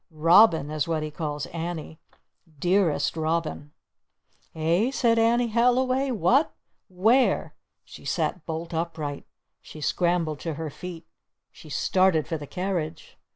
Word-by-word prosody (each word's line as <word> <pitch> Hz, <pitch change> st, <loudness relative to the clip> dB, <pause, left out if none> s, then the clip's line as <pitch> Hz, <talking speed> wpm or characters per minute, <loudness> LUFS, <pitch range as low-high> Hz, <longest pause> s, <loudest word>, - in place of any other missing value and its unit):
'Robin' 165 Hz, -1 st, +5 dB
is 155 Hz, 0 st, -1 dB
what 160 Hz, -2 st, -1 dB
he 155 Hz, -, -5 dB
calls 150 Hz, -2 st, -4 dB
Annie! 165 Hz, -1 st, -5 dB, 0.6 s
'Dearest 170 Hz, -3 st, +1 dB
Robin' 160 Hz, -2 st, -2 dB, 0.5 s
" -, -, -39 dB
"Eh?" 170 Hz, +9 st, +1 dB
said 235 Hz, -4 st, +2 dB
Annie 235 Hz, +1 st, +3 dB
Halliway. 255 Hz, +3 st, +2 dB
"What? 245 Hz, -, +2 dB, 0.3 s
Where?" 220 Hz, +8 st, +2 dB, 0.3 s
She -, -, -13 dB
sat 180 Hz, -, -2 dB
bolt 165 Hz, +1 st, -5 dB
upright! 160 Hz, -3 st, -4 dB, 0.3 s
She 155 Hz, -, -12 dB
scrambled 170 Hz, -1 st, 0 dB
to 165 Hz, -3 st, -4 dB
her 160 Hz, 0 st, -5 dB
feet! 170 Hz, +1 st, -9 dB, 0.5 s
She 155 Hz, -, -15 dB
started 185 Hz, +1 st, +2 dB
for 160 Hz, -, -3 dB
the 145 Hz, -, -8 dB
carriage! 175 Hz, -3 st, -4 dB
170 Hz, 130 wpm, -25 LUFS, 155-200 Hz, 0.6 s, Robin